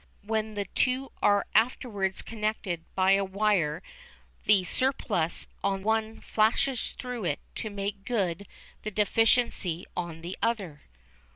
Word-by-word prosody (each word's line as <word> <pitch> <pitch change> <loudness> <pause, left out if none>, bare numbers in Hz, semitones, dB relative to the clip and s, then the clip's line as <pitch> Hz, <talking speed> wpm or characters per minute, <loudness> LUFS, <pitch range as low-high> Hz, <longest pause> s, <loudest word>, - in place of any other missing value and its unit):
When 220 0 -1
the 205 -1 -1
two 255 +7 0
are 205 -1 +4
afterwards 215 -4 +1
connected 210 -6 -2
by 190 0 +4
a 195 0 +5
wire 190 -6 +1 0.6
the 200 -3 +5
surplus 180 -7 0 0.2
on 195 -1 0
one 220 +1 0
flashes 225 +4 +2
through 250 -5 -5
it 145 -4 0 0.2
to 215 - -3
make 200 0 -4
good 200 -5 -1 0.3
the 215 - -3
deficiency 210 -4 +2
on 170 -2 -4
the 175 +3 -5
other. 200 -10 -1
205 Hz, 125 wpm, -28 LUFS, 185-225 Hz, 0.6 s, a